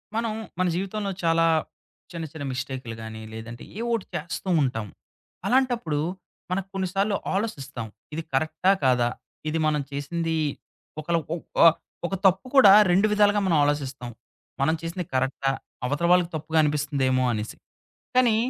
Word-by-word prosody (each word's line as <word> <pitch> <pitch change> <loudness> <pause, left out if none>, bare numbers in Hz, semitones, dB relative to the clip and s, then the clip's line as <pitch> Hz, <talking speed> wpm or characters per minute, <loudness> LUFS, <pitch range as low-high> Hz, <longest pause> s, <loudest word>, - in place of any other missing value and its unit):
మనం 230 -1 0 0.3
మన 185 - +3
జీవితంలో 195 +2 -2
చాలా 165 0 +4 0.7
చిన్న 170 -2 -5
చిన్న 155 -3 -7
మిస్టేకులు 130 -2 -5
గాని, 110 0 -7
లేదంటే 115 +1 -8
ఏ - - -3
ఓటి 230 -4 0
చేస్తూ 170 +4 -4
ఉంటాం. 115 -6 -1 0.6
అలాంటప్పుడు. 245 - +1 0.5
మనకు 190 +1 -1
కొన్నిసార్లు 195 +2 0 0.2
ఆలోసిస్తాం. 140 - -3 0.3
ఇది 165 +2 -3
కరెక్టా 155 +6 +2
కాదా? 125 -2 +4 0.4
ఇది 160 +1 -1
మనం 150 -1 +2
చేసింది 160 +4 -2 0.6
ఒకళ 170 +3 -1 0.2
ఒహ్ 170 - -4 0.2
ఆ - - +12 0.4
ఒక 195 - -2
తప్పు 190 +5 +4
కూడా 255 -8 +9 0.2
2 195 +4 +4
విధాలుగా 205 0 +4
మనం 175 -3 +3
ఆలోచిస్తాం. 135 -4 -1 0.5
మనం 160 +4 +3
చేసింది 170 +2 -4
కరెక్టా? 135 +1 +1 0.3
అవతల 145 +6 0
వాళ్ళకి 180 -1 +4
తప్పుగా 160 +1 0
అనిపిస్తుందేమో 140 -3 +1
అనేసి. 105 0 -4 0.6
కానీ. 245 -4 +5
160 Hz, 135 wpm, -25 LUFS, 135-190 Hz, 0.7 s, ఆ